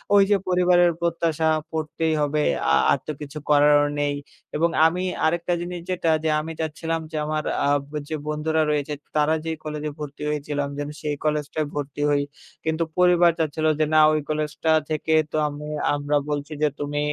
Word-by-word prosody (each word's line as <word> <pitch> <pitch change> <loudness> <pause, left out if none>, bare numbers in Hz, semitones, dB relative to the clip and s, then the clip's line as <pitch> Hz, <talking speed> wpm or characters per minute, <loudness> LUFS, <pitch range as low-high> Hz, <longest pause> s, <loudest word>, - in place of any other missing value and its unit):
ওই 200 - +7
যে - - +6
পরিবারের 180 -1 +4
প্রত্যাশা 165 -2 0 0.2
পড়তেই 160 0 -1
হবে 150 +1 +1 0.3
আ - - +4 0.2
আর - - +2
তো - - -1
কিছু 150 +1 -7
করারও 145 0 +5
নেই 145 0 0 0.4
এবং 165 +3 +2 0.2
আমি 180 +3 +1 0.2
আরেকটা 170 +2 +1
জিনিস 175 0 -5
যেটা 175 -3 0
যে 160 - +1
আমি 160 +1 -5
চাচ্ছিলাম 160 +1 -2
যে 155 - -3
আমার 155 0 -1 0.2
আ - - +2 0.4
যে 155 - -2
বন্ধুরা 155 +1 0
রয়েছে 150 0 -1 0.2
তারা 150 +1 +3
যেই 160 -1 -2
কলেজ 150 -1 -5
এ - - -7
ভর্তি 150 0 -7
হয়েছিল 150 -1 -3
আমি 140 - -7
যেন 145 - -3
সেই 150 -1 -2
কলেজটায় 150 0 -1
ভর্তি 145 0 -4
হই। 145 -1 +2 0.4
কিন্তু 160 +1 0
পরিবার 175 -1 +5
চাচ্ছিল 155 0 -1
যে 155 - +4
না 155 - +6
ওই 155 - +2
কলেজটা 155 +1 -1 0.2
থেকে 155 +1 -1 0.2
তো - - -1
আমু 150 0 -7 0.3
আমরা 145 +1 0
বলছি 145 +1 -3
যে - - +5
তুমি 145 0 -2
155 Hz, 180 wpm, -24 LUFS, 150-165 Hz, 0.4 s, ওই